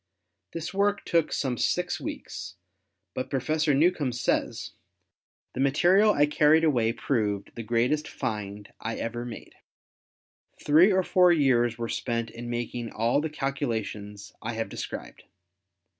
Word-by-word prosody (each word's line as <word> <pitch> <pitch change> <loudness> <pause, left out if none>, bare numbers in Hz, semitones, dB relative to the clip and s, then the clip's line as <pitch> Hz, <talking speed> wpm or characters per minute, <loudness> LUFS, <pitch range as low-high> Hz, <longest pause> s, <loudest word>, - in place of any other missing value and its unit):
This 165 +2 -5
work 200 +1 +1
took 165 -2 +1
some 125 -5 -1
six - - 0
weeks, 95 +1 -6 0.6
but 130 - -4
Professor 150 +2 +1
Newcomb 150 -4 +2
says, 115 -2 -1 0.8
"The - - -6
material 175 +10 +4
I 145 -7 +4
carried 150 +2 +4
away 120 -8 +3
proved 110 -5 -1
the 115 - -6
greatest 120 +7 0
find 105 -5 -5
I 115 +1 -4
ever 120 +1 -4
made. 120 - -9 1.1
Three 160 +7 +5
or 190 -1 +3
four 180 0 +5
years 120 -7 +3
were 115 -1 -3
spent 115 -1 -2
in 120 +1 -7
making 120 0 -4
all 115 +6 +1
the 160 - -2
calculations 110 -8 -4
I 120 +2 -4
have 115 0 -3
described. - - -7
125 Hz, 135 wpm, -27 LUFS, 115-155 Hz, 1.1 s, Three